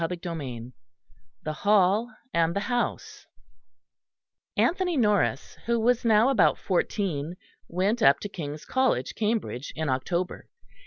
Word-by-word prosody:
CHAPTER 180 +2 -1 0.2
II 125 -5 -6 0.7
THE 155 - -3
HALL 205 +5 +3 0.2
AND 170 0 +2
THE 200 - 0
HOUSE 245 0 -3 1.3
Anthony 340 - +1
Norris, 210 - +1
who 235 0 +2
was 245 +2 +2
now 225 +1 +4
about 270 - +4
fourteen, 175 -4 -1 0.3
went 195 +7 0
up 140 -6 +6
to - - -3
King's 150 -6 -7
College, 260 -1 +1
Cambridge, 210 - -2
in 155 -2 -2
October. 170 +8 -2
200 Hz, 120 wpm, -26 LUFS, 155-230 Hz, 1.3 s, up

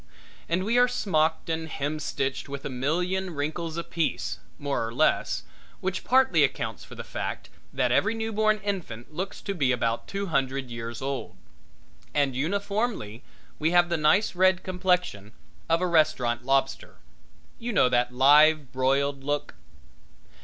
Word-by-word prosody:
And 170 +3 +1
we 230 +4 +2
are 245 - +6
smocked 160 -9 0
and 160 -1 -2
hem 145 +2 -3
stitched 135 -2 -3
with 140 0 -6
a - - -3
million 175 +7 -1
wrinkles 160 +3 -3
apiece, 170 -1 -2 0.2
more 145 -4 -2
or 115 - -3
less, - - +1 0.4
which 190 0 -3
partly 265 +1 +4
accounts - - -2
for - - -12
the - - -7
fact - - -5 0.2
that - - 0
every 225 - +2
newborn 220 -1 +1
infant 160 - -5
looks 190 +5 -5
to 200 - -2
be 140 -8 +1
about 115 -1 -1
two 200 0 -3
hundred 135 -6 -1
years 115 +1 -6
old. 135 -10 -4 0.8
And 140 -3 +2
uniformly 200 - -2 0.4
we 155 - +2
have 175 0 +4
the 170 - +1
nice 160 +8 +3
red 185 0 +3
complexion 180 - -1 0.4
of 165 +1 +3
a 180 - +1
restaurant 140 -8 +2
lobster. 135 +1 0 0.6
You 240 0 -3
know 165 - +4
that 125 0 +1
live 145 +2 +5
broiled 135 +1 +1
look? 145 +1 -2
155 Hz, 150 wpm, -26 LUFS, 135-185 Hz, 0.8 s, are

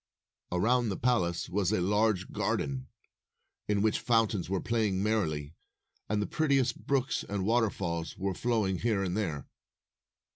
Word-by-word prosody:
Around 115 +6 +2
the 95 - -2
palace 95 -9 +1
was 95 0 0
a 110 - +2
large 105 +1 +1
garden, 90 - -1 0.8
in 105 -1 +1
which 110 - +2
fountains 110 -6 +1
were 95 -1 0
playing 105 -4 0
merrily, 80 -9 0 0.6
and 105 0 +1
the 105 - 0
prettiest 135 -5 +1
brooks 135 -1 +1
and 100 -2 -1
waterfalls 95 -8 0
were 95 0 -1
flowing 105 -4 0
here 110 -4 +1
and 90 -1 -2
there. 85 -10 -2
105 Hz, 140 wpm, -30 LUFS, 90-115 Hz, 0.8 s, Around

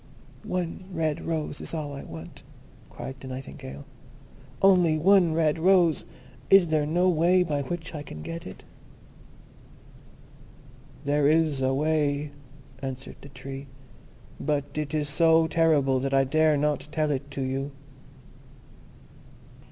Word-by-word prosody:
"One 180 0 -3
red 160 -4 -1
rose 155 -3 -3
is - - -4
all 150 -3 -4
I 140 - -6
want," 80 0 -10 0.5
cried 135 0 -8
the 130 - -9
Nightingale, 130 +1 -8 0.7
"only 180 -5 +5
one 175 -1 +4
red 160 -1 +2
rose! 175 -3 +4 0.4
Is 195 -4 +6
there 155 -2 +1
no 175 +4 +2
way 180 +1 +4
by 150 -4 -1
which 165 +4 -5
I 150 - -5
can 75 - -9
get 165 0 -6
it?" 95 - -11 2.4
"There 145 0 +2
is 155 -3 +2
a 130 0 +2
way," 150 -1 0 0.5
answered 135 -1 -6
the 140 - -12
Tree; 135 +1 -8 0.7
"but 145 -2 -2
it 150 0 -3
is 150 -1 0
so 160 +2 +4
terrible 155 -5 +2
that 135 +1 -1
I 135 - +5
dare 155 +2 +3
not 145 -1 0
tell 155 -1 0
it 140 0 -3
to 140 -1 -4
you." 135 +2 -2
150 Hz, 135 wpm, -26 LUFS, 140-165 Hz, 2.4 s, Is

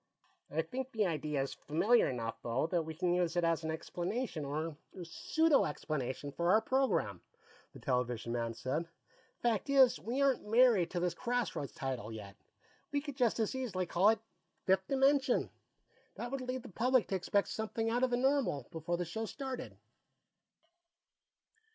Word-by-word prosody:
"I 160 +2 0
think 255 +10 -5
the 220 -2 +1
idea's 150 -5 -1
familiar 205 +11 +3
enough, 115 -3 -4
though, 120 +4 0
that 170 +1 +1
we 160 0 -6
can 175 +1 +1
use 175 -1 +1
it 175 - +2
as 165 -1 +1
an 160 - -2
explanation, 175 - -3
or 155 +3 -3 0.3
pseudo 315 - +2
explanation, 145 -2 -3
for 170 +6 +3
the - - +6
program," 265 +4 +1 0.5
the - - -12
television 125 -4 -1
man 115 -1 -2
said. 155 +8 -2 0.5
"Fact 235 +2 +1
is, 265 - +6
we 230 - -3
aren't 275 -6 +2
married 225 -6 +5
to 180 - -2
this 175 -1 0
Crossroads 235 - -2
title, 130 -5 -4
yet; 105 -3 -8 0.6
we 285 - +1
could 285 -2 -7
just 245 -4 +2
as 220 - +1
easily 210 -9 -2
all 190 +4 +6
it 220 -1 +3 0.5
Fifth 190 0 +3
Dimension. 270 -1 +3 0.6
That 240 - -5
would 275 -1 -2
lead 255 -1 -3
the - - -9
public, 250 +4 +2
to 195 - 0
expect 200 +2 +1
something 225 +1 -2
out 240 +2 +1
of 260 - +3
the 245 - +1
normal 260 - +1
before 170 +1 -2
the 175 - -2
show 220 +7 -3
started." 265 +2 -6
185 Hz, 165 wpm, -34 LUFS, 155-245 Hz, 0.6 s, the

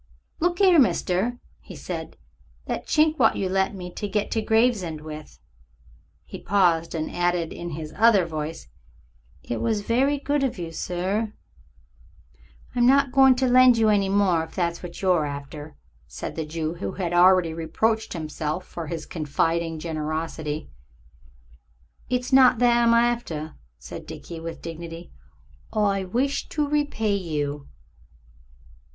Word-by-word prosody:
"Look 350 +1 0
'ere, 365 -4 +6
mister," 195 +1 +1 0.2
he - - -12
said; - - -6 0.5
"that - - -4
chink 310 0 +2
wot 225 -3 +4
you 195 - -1
lent 190 +1 0
me 180 -1 -7
to 205 - -4
get 210 0 -2
to 225 - 0
Gravesend 220 -8 +1
with." 155 0 -9 0.9
He - - -9
paused, 175 -4 +2
and 155 -1 -4
added 175 -1 0
in 175 - -6
his 155 -1 -7
other 215 -5 +5
voice, 155 - -5 0.8
"It 120 - -4
was 220 -3 0
very 260 +7 +1
good 285 0 -1
of 260 -5 -1
you, 170 -2 -5
sir." 190 +6 -2 1.4
"I'm 245 -1 +3
not 275 0 +4
going 265 -1 +6
to 260 +1 +1
lend 250 -1 +6
you 220 -1 +3
any 200 -2 +2
more, 190 -5 +2
if 160 - -11
that's 170 -2 -1
what 175 -1 -8
you're 175 -5 +3
after," 145 +1 -8 0.3
said - - -7
the 160 -1 -4
Jew, 160 0 -3
who 175 - -5
had 175 -3 -3
already 180 -1 +5
reproached 220 +8 -1
himself 155 +1 -4
for 165 -2 -7
his 165 0 -5
confiding 165 +1 -1
generosity. 155 -1 -4 1.4
"It's 250 +1 -1
not 260 -2 +7
that 240 0 +4
I'm 230 - +5
after," 235 -11 0 0.2
said - - -9
Dickie, 170 -1 -8
with 165 0 -7
dignity. 165 +1 -8 0.6
"I 200 -2 +1
wish 260 +9 -1
to 300 -2 -1
repay 285 -8 0
you." 150 -6 -3
185 Hz, 145 wpm, -24 LUFS, 165-235 Hz, 1.4 s, not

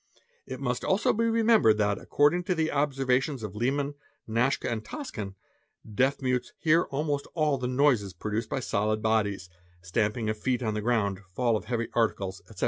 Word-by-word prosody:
It 130 - -6
must 125 -2 -2
also 190 - +2
be 230 +2 +1
remembered 225 - +4
that, 105 -1 +1
according 160 +5 +2
to 185 -2 0
the 160 -1 0
observations 135 -2 0
of 105 -2 -6
Liman, 140 +5 0 0.3
Naschka, 115 +5 +1
and 110 -2 -2
Toscan, 110 - -6 0.5
deaf 130 +6 0
mutes 125 -1 -1
hear 165 +1 +3
almos 145 0 -1
all 150 -4 +1
the 125 - -2
noises 125 -6 +2
produced 110 +3 -3
by 135 - -2
solid 110 -1 0
bodies, 100 -4 +1 0.4
stamping 105 +6 -1
of 110 0 -2
feet 125 +2 0
on 110 -2 0
the 105 - -2
grounc¢ 105 -4 0 0.2
fall 120 -3 +2
of 105 - -3
heavy 115 -2 -2
articles, 100 -5 0
etc. - - -12
125 Hz, 175 wpm, -28 LUFS, 110-145 Hz, 0.5 s, remembered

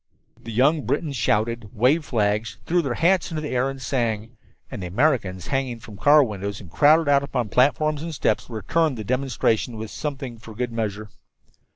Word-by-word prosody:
The 115 - -8
young 140 +7 +3
Britons 150 -1 -1
shouted, 115 0 0
waved 135 +8 +3
flags, 105 -2 0
threw 175 +1 +2
their 135 -6 -2
hats 180 +2 +2
into 160 -2 -3
the 150 -1 -4
air 130 +1 +1
and 135 0 -7
sang. 115 -3 -2 0.4
And 100 - -6
the 90 - -4
Americans, 100 - 0
hanging 130 -3 -1
from 110 -2 -12
the - - -20
car 145 +1 +7
windows, 100 -3 -4
and 90 -5 -13
crowded 155 - +5
out 140 -1 +4
upon 125 -5 -2
the - - -15
platforms 145 +3 +2
and 165 +1 -4
steps, 155 - -1
returned 130 - 0
the 110 - -5
demonstration 125 -1 0
with 110 0 -6
something 135 -6 -5
for 110 -1 -12
good 125 +1 -2
measure. 110 -2 -4
125 Hz, 195 wpm, -23 LUFS, 110-145 Hz, 0.4 s, car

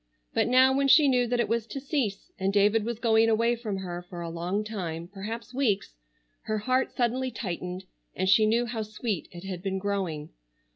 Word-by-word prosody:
But - - +2
now 260 +2 +5
when 275 0 +2
she 290 +1 +7
knew 250 -2 +3
that 245 +1 0
it 235 - +2
was 230 +1 -1
to 275 - -5
cease, 265 -8 -2
and 190 +1 +1
David 205 +2 +3
was 235 0 -3
going 225 -1 +4
away 230 +2 +3
from 220 -4 -4
her 175 -2 -5
for 175 -1 -9
a 170 -1 -4
long 175 +5 -2
time, 170 -6 -5
perhaps 215 +6 -7
weeks, 235 - 0 0.5
her 215 0 -1
heart 255 +5 +1
suddenly 255 +2 0
tightened 180 -4 -5 0.3
and 185 - 0
she 215 +3 +5
knew 235 +2 +2
how 230 -1 -3
sweet 215 -3 -3
it 175 0 -10
had 185 -2 -5
been 190 0 -2
growing. 190 -6 -2
215 Hz, 200 wpm, -27 LUFS, 190-240 Hz, 0.5 s, she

